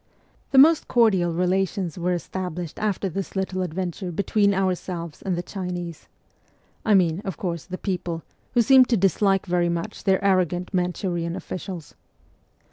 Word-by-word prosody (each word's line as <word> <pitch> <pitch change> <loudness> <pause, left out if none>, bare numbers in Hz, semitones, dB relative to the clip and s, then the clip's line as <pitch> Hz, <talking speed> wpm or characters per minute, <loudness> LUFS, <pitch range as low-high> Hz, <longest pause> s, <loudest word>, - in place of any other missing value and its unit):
The 270 - +1
most 310 +4 +7
cordial 195 -8 +3
relations 180 0 0
were 180 0 0
established 175 -2 -5
after 205 -2 -1
this 195 +2 -5
little 190 -1 -1
adventure 180 +1 -3
between 200 +3 +2
ourselves 180 -4 -2
and 190 -2 -1
the 175 - -3
Chinese 175 -4 -6 0.8
I 215 - +4
mean, 175 -1 +2
of 195 -5 -5
course, 170 -4 -3
the 185 0 -6
people, 175 -4 -3 0.3
who 240 - +5
seemed 260 +1 +6
to 235 - +3
dislike 195 +1 +2
very 175 -1 +1
much 170 +6 -4
their 190 -1 +2
arrogant 180 -1 +1
Manchurian 180 -1 -1
officials. 180 -5 -7
185 Hz, 145 wpm, -24 LUFS, 175-195 Hz, 0.8 s, most